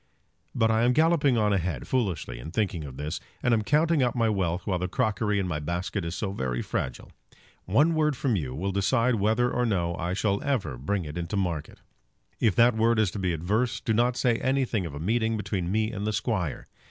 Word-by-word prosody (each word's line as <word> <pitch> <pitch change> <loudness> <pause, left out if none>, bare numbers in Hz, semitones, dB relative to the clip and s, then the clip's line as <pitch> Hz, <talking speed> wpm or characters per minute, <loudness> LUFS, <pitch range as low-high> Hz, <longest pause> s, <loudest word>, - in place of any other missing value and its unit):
But 110 0 +3
I 110 0 +2
am 120 +1 +4
galloping 155 -4 +3
on 105 -2 +2
a 100 - +2
head 90 -1 -4
foolishly 90 - -1
in 70 - -7
thinking 90 -4 -1
of 65 -2 -9
this, 75 +4 -4 0.2
and 125 - +3
am 110 - +3
counting 155 +6 +2
up 125 -2 +1
my 115 -2 +2
wealth 90 -4 -1
while 95 -3 0
the 90 - -1
crockery 105 0 0
in 95 -2 0
my 80 -4 -2
basket 90 +5 -3
is 85 +1 -4
so 95 +3 -2
very 65 -9 -2
fragile. 65 - -4 0.5
One 145 - +3
word 150 -3 +1
from 125 -5 +1
you 65 -8 -3
will 95 +6 -2
decide 115 +6 +2
whether 110 +4 +2
or 125 - 0
no 90 -7 0
I 85 +2 -2
shall 100 0 0
ever 130 - -1
bring 90 +9 -2
it 75 +3 -5
into 85 +4 -3
market. 85 -6 -3 0.6
If 110 -5 +2
that 120 0 +5
word 115 +1 +3
is 105 -5 +2
to 100 - -5
be 90 -2 0
adverse 105 +9 0
do 110 - -1
not 120 +2 +2
say 120 -3 +2
anything 130 -8 0
of 70 - -8
a - - -6
meeting 110 +5 0
between 95 -4 -2
me 110 +2 +1
and 105 -2 -4
the 110 - 0
Squire. 100 - -2
105 Hz, 225 wpm, -27 LUFS, 85-120 Hz, 0.6 s, that